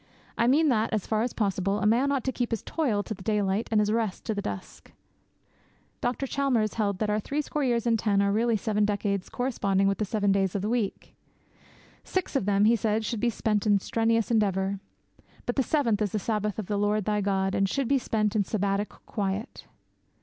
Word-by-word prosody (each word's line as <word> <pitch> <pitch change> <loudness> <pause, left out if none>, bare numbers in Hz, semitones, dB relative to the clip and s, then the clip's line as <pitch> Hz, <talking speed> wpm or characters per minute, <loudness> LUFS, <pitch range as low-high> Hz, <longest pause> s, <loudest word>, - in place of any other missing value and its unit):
I 235 - +2
mean 300 +4 +4
that, 220 -3 +1
as 215 -3 0
far 220 -1 0
as 240 +1 -1
possible, 195 -2 0
a 210 - -1
man 245 +6 +3
ought 275 -4 0
to 260 - -1
keep 245 -2 -2
his 225 -3 -3
toil 235 -11 0
to 220 - -5
the 190 - -12
daylight, 205 0 0
and 220 - +3
his 210 0 +2
rest 220 -4 -1
to 220 - -1
the 205 - -3
dusk. 100 - -7 1.1
Dr. 245 +3 -1
Chalmers 255 -6 0
held 205 -3 0
that 210 +1 -1
our 210 - +1
three 290 +7 -2
score 295 0 -2
years 240 -3 +1
and 230 -2 +2
ten 205 -2 +2
are 200 0 +2
really 225 +2 +2
seven 210 0 0
decades 200 -2 -1
corresponding 200 -6 0
with 195 - 0
the 215 - +1
seven 205 0 +1
days 195 -1 +1
of 200 - -1
the 210 - -1
week. 230 -4 -2 0.9
Six 370 -5 -3
of 270 - +1
them, 200 0 +3
he 230 +2 +5
said, 220 0 0
should 230 - -2
be 240 - +2
spent 215 -2 0
in 205 -1 +5
strenuous 230 +3 0
endeavour. 195 -3 +1 0.7
But 245 - -2
the 275 - +3
seventh 235 -6 +1
is 205 -3 -1
the - - +1
Sabbath 210 -1 -2
of 215 - -3
the 205 +2 -2
Lord 205 0 +1
thy 210 -1 +1
God, 195 -1 0
and 195 0 +1
should 275 +1 -1
be 275 +1 +3
spent 215 -3 -1
in 210 - +3
Sabbatic 200 0 -1 0.2
quiet. 200 0 -4
215 Hz, 220 wpm, -27 LUFS, 200-235 Hz, 1.1 s, he